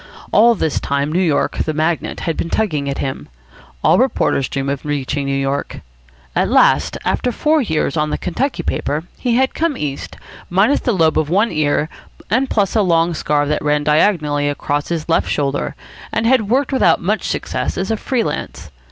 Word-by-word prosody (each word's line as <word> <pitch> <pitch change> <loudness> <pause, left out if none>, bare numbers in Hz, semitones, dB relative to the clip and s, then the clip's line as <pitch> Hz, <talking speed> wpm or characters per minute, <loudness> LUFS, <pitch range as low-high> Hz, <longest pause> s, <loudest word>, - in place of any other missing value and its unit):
All 235 +2 +5
this 160 -6 -1
time 140 +1 -1
New 180 +4 +1
York, 160 -6 0
the 155 - -1
magnet, 160 +2 -1
had 165 - -2
been 170 - -3
tugging 155 -11 -1
at 140 - -3
him. 135 -1 -4 0.5
All - - +4
reporters 135 - +1
dream 135 -1 -3
of 140 -1 -2
reaching 145 -1 -2
New 135 0 0
York. 135 +1 -3 0.5
At - - +1
last, - - +3
after 250 - 0
four 305 +6 +2
years 160 - -1
on 150 -1 0
the - - -1
Kentucky 255 +10 -2
paper, 150 +2 -2 0.2
he 245 -2 0
had 260 +1 +2
come 325 -3 -1
East, 140 -2 -5 0.3
minus 195 +10 +3
the 245 - 0
lobe 165 -6 +2
of 155 -1 -1
one 205 +6 +2
ear 150 0 +1 0.4
and 255 +4 +2
plus 200 -2 0
a 220 - +4
long 170 -2 +2
scar 150 -2 0
that 150 +1 -1
ran 150 0 +1
diagonally 150 -2 +2
across 145 0 -2
his 165 -3 -3
left 165 - +1
shoulder, 140 -1 -1 0.4
and 225 - -1
had 230 -4 +3
worked 270 +3 +1
without 265 - +4
much - - -1
success - - -3
as 190 +3 -2
a - - +2
free 240 +2 -1
lance. 85 - -5
160 Hz, 190 wpm, -18 LUFS, 145-220 Hz, 0.5 s, All